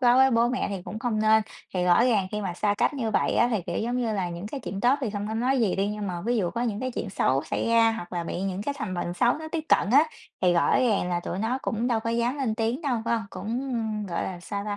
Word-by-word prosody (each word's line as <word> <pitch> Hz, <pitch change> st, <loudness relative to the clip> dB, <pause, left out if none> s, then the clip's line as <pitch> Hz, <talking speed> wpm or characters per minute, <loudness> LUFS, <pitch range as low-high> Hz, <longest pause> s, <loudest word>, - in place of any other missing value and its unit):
quá 245 Hz, -1 st, +5 dB
với 265 Hz, 0 st, +6 dB
bố 235 Hz, 0 st, +3 dB
mẹ 250 Hz, +1 st, -1 dB
thì 195 Hz, -3 st, -4 dB
cũng 215 Hz, -, -6 dB
không 225 Hz, -2 st, -1 dB
nên, 220 Hz, 0 st, +5 dB, 0.3 s
thì 180 Hz, -, +1 dB
rõ 180 Hz, +6 st, +5 dB
ràng 215 Hz, -7 st, +2 dB
khi 210 Hz, -, -2 dB
mà 190 Hz, -4 st, -3 dB
xa 205 Hz, +3 st, +1 dB
cách -, -, +2 dB
như 235 Hz, -5 st, -2 dB
vậy -, -, +1 dB
á 235 Hz, -, +4 dB
thì, 215 Hz, -6 st, 0 dB
kiểu -, -, -2 dB
giống 240 Hz, +3 st, -1 dB
như 230 Hz, -3 st, 0 dB
là, 190 Hz, -3 st, -1 dB
những 170 Hz, +3 st, -6 dB
cái 270 Hz, +6 st, -5 dB
chuyện 195 Hz, -4 st, -5 dB
tốt 245 Hz, +4 st, +4 dB
thì 250 Hz, -6 st, -1 dB
không 205 Hz, 0 st, -4 dB
có 220 Hz, -, -3 dB
nói 255 Hz, +3 st, +1 dB
gì 210 Hz, -5 st, +1 dB
đi, 195 Hz, +1 st, +1 dB
nhưng 210 Hz, -1 st, -4 dB
mà 175 Hz, -2 st, -3 dB
ví 240 Hz, +2 st, 0 dB
dụ 180 Hz, -5 st, 0 dB
có 235 Hz, +6 st, -2 dB
những 220 Hz, -3 st, -2 dB
cái 255 Hz, -, -2 dB
chuyện 230 Hz, -4 st, -4 dB
xấu 135 Hz, -7 st, +1 dB
xảy -, -, -2 dB
ra, 230 Hz, -1 st, +5 dB
hoặc 180 Hz, -5 st, -7 dB
là 170 Hz, -1 st, -2 dB
bị 175 Hz, -, -4 dB
những 195 Hz, 0 st, -2 dB
cái 285 Hz, +5 st, -2 dB
thành 185 Hz, -3 st, -3 dB
bệnh 175 Hz, 0 st, -3 dB
xấu 240 Hz, +6 st, +3 dB
nó 315 Hz, 0 st, -7 dB
tiếp 330 Hz, -2 st, -1 dB
cận -, -, +3 dB
á, 280 Hz, +5 st, +7 dB, 0.4 s
thì 180 Hz, -1 st, +4 dB
rõ 170 Hz, -, +3 dB
ràng 215 Hz, -7 st, +2 dB
là 175 Hz, -1 st, 0 dB
tụi 175 Hz, -, -4 dB
nó 225 Hz, +5 st, 0 dB
cũng 230 Hz, +1 st, -1 dB
đâu 230 Hz, -3 st, +1 dB
có 230 Hz, -, -2 dB
dám 235 Hz, +4 st, 0 dB
lên 250 Hz, -6 st, 0 dB
tiếng 230 Hz, +7 st, -1 dB
đâu, 265 Hz, -6 st, 0 dB
phải 235 Hz, 0 st, +1 dB
hông? 225 Hz, -1 st, -3 dB
Cũng, 240 Hz, +7 st, -3 dB, 0.3 s
gọi 170 Hz, -2 st, -2 dB
là, 180 Hz, -2 st, -5 dB
sao 200 Hz, +3 st, -4 dB
ta? 205 Hz, -1 st, -3 dB
220 Hz, 310 wpm, -26 LUFS, 195-240 Hz, 0.4 s, á